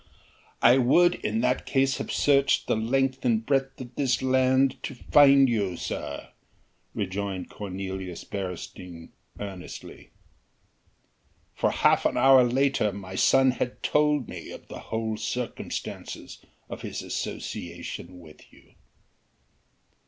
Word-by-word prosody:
"I 125 +3 +7
would 175 +8 +5
in 110 +2 0
that 125 +1 0
case 135 -1 +1
have - - -4
searched 140 -1 +3
the - - +1
length 130 +4 0
and 115 -3 +1
breadth 135 0 0
of 125 -1 -9
this 130 0 0
land 130 0 +2
to 135 - -6
find 140 +2 +6
you, 100 -7 -1
sir," 70 - -5 0.7
rejoined 95 -1 -3
Cornelius 95 -3 -6
Beresteyn 90 -3 -7 0.3
earnestly, 95 -3 -9 1.4
"for - - +1
half - - +3
an - - -3
hour 130 0 +7
later 125 -3 +1
my 95 -1 -8
son 130 +6 +4
had 125 0 -4
told 150 -3 +2
me - - -8
the - - -8
whole 110 -1 -2
circumstances 125 +2 -5 0.3
of - - -8
his - - -5
association 90 -1 -6
with 80 -3 -16
you." - - -22
125 Hz, 120 wpm, -26 LUFS, 100-135 Hz, 1.4 s, I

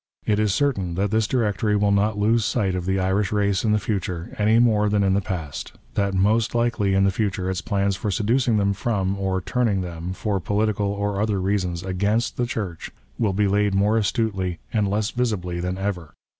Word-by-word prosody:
It 105 -1 +1
is 105 -1 +2
certain 100 -7 0
that 100 +2 0
this 110 -1 +2
directory 105 -3 +1
will 100 0 +2
not 100 +1 +2
lose 110 +2 +2
sight 100 -4 0
of 90 -1 -3
the 95 0 +1
Irish 95 +1 0
race 100 -2 +1
in 110 - +2
the 105 - +4
future, 95 -5 -3
any 110 +2 +4
more 110 -3 +3
than 105 -1 +2
in 95 -1 +2
the 100 - +2
past; 85 -7 -5 0.2
that 100 -1 0
most 110 +5 +2
likely 105 -5 +1
in 95 - +3
the 100 - +3
future 95 -2 -1
its 90 -2 -3
plans 100 +1 0
for 105 - -3
seducing 115 +4 +1
them 100 -1 +2
from, 100 -1 -1
or 95 -1 -1
turning 115 -4 0
them, 85 0 -5
for 100 +1 -2
political 105 +2 0
or 100 0 -1
other 105 -2 0
reasons, 90 -3 -1
against 100 +5 0
the 120 - -1
Church, 100 -8 -4 0.3
will 110 -4 +2
be 105 +1 +2
laid 100 0 +1
more 105 +3 +3
astutely 100 -5 0 0.2
and 105 -3 +2
less 105 +2 0
visibly 100 -8 -2
than 90 +1 -2
ever. 95 -6 -4
100 Hz, 205 wpm, -23 LUFS, 95-110 Hz, 0.3 s, the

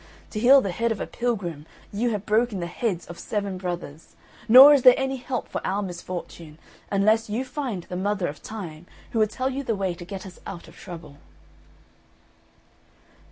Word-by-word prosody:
To 215 - -3
heal 265 +4 +7
the 195 - -2
head 230 +6 0
of 220 - -2
a - - -2
pilgrim, 180 -11 -3 0.3
you 235 +4 0
have 210 -3 -3
broken 215 -1 +1
the 170 - -3
heads 180 0 -2
of 175 - -10
seven 200 -3 -3
brothers; 175 -4 -6 0.3
nor 265 +5 +11
is 280 - +4
there 250 0 +8
any 265 0 -1
help 250 -1 -4
for - - -4
our 200 +2 -1
misfortune, 175 -3 -7 0.3
unless 215 +3 +2
you 235 +5 -2
find 255 - -4
the 180 - -7
Mother 195 0 -1
of 145 - -7
Time, 175 -6 -8 0.2
who 225 - 0
will 215 - +4
tell 255 +5 -2
you 270 +2 -3
the 230 -4 -1
way 190 -2 -1
to 175 - -10
get 190 +2 -7
us 185 -1 -11
out 175 -4 -8
of 165 - -15
trouble." 165 -6 -10
200 Hz, 190 wpm, -25 LUFS, 175-235 Hz, 0.3 s, nor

